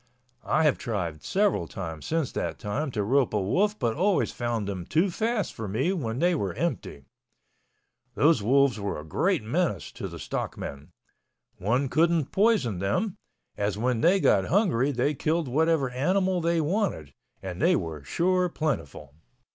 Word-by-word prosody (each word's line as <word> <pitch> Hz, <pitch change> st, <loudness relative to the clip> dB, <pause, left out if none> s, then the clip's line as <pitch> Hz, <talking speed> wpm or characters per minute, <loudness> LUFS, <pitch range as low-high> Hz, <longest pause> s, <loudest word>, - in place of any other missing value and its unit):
I 155 Hz, -, +3 dB
have 150 Hz, -3 st, +3 dB
tried 85 Hz, -9 st, -3 dB
several 195 Hz, -, +1 dB
times 80 Hz, -4 st, -6 dB
since 160 Hz, -4 st, 0 dB
that -, -, -3 dB
time 135 Hz, +9 st, -3 dB
to 110 Hz, -5 st, -2 dB
rope 130 Hz, +1 st, +2 dB
a -, -, +2 dB
wolf 200 Hz, -, +1 dB
but 115 Hz, -3 st, -1 dB
always 190 Hz, +3 st, +1 dB
found 120 Hz, -4 st, -2 dB
them 95 Hz, -3 st, -4 dB
too 170 Hz, -, +1 dB
fast 220 Hz, +1 st, -1 dB
for 110 Hz, -2 st, -6 dB
me 130 Hz, -, 0 dB
when 120 Hz, -10 st, -3 dB
they 175 Hz, +5 st, +3 dB
were 100 Hz, -, -2 dB
empty. 120 Hz, -, -3 dB, 1.1 s
Those 150 Hz, -5 st, +4 dB
wolves 135 Hz, +2 st, +3 dB
were 100 Hz, -6 st, -3 dB
a -, -, -8 dB
great 80 Hz, -, 0 dB
menace 115 Hz, -, -1 dB
to -, -, -6 dB
the -, -, -8 dB
stockmen. 70 Hz, +4 st, -5 dB, 0.7 s
One 125 Hz, +8 st, +1 dB
couldn't 165 Hz, 0 st, +2 dB
poison 195 Hz, -, +2 dB
them, 105 Hz, -, -1 dB, 0.4 s
as 100 Hz, -1 st, -1 dB
when 120 Hz, +1 st, 0 dB
they 185 Hz, +4 st, +4 dB
got 95 Hz, -, +3 dB
hungry 145 Hz, -, +2 dB
they 140 Hz, +3 st, 0 dB
killed 155 Hz, +3 st, -1 dB
whatever 150 Hz, 0 st, +1 dB
animal 185 Hz, +7 st, +1 dB
they 165 Hz, 0 st, +1 dB
wanted, 155 Hz, -, -1 dB, 0.3 s
and 95 Hz, +2 st, -5 dB
they 175 Hz, +3 st, +4 dB
were 80 Hz, -, -4 dB
sure 180 Hz, -, +1 dB
plentiful. 80 Hz, -, -3 dB
135 Hz, 165 wpm, -27 LUFS, 100-170 Hz, 1.1 s, Those